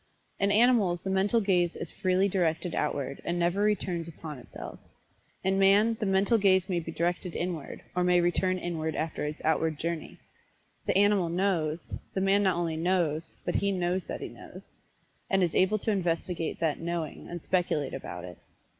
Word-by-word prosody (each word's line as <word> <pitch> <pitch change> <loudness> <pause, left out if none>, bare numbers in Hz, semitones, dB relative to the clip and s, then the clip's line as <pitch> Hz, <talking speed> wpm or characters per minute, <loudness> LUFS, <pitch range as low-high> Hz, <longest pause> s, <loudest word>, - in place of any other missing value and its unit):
In 200 0 +2
animals 210 -6 +4
the 190 - -2
mental 195 +4 +3
gaze 180 -4 +2
is 170 - -5
freely 185 0 +2
directed 175 -2 0
outward, 140 -2 -2
and 175 - -1
never 175 +3 +1
returns 185 -5 0
upon 155 -3 -8
itself. - - -9 0.6
In 190 +1 +2
man 205 +4 +5
the 210 - -1
mental 195 +4 +3
gaze 190 -2 +4
may 180 -3 0
be 165 0 -6
directed 175 +1 -2
inward, 170 -4 -4
or 180 - +2
may 180 0 +4
return 185 +1 +1
inward 160 -3 -3
after 155 -1 -2
its 150 +1 -4
outward 160 0 +1
journey. 165 0 -4 0.7
The - - +3
animal 200 -3 +4
"knows" 170 -3 -1 0.2
the - - +1
man 195 +1 +4
not 190 -3 +3
only 165 -2 -1
"knows," 165 -2 0
but - - -1
he 200 - +1
"knows 180 0 -1
that - - -5
he - - -4
knows," - - -13 0.6
and 195 -1 +3
is 170 - 0
able 190 +3 +3
to 220 - -1
investigate 170 -3 -1
that 160 -3 0
"knowing" 165 -2 -4
and 175 - -5
speculate 170 -4 0
about 90 -9 -6
it. 90 -1 -9
175 Hz, 180 wpm, -29 LUFS, 165-195 Hz, 0.7 s, man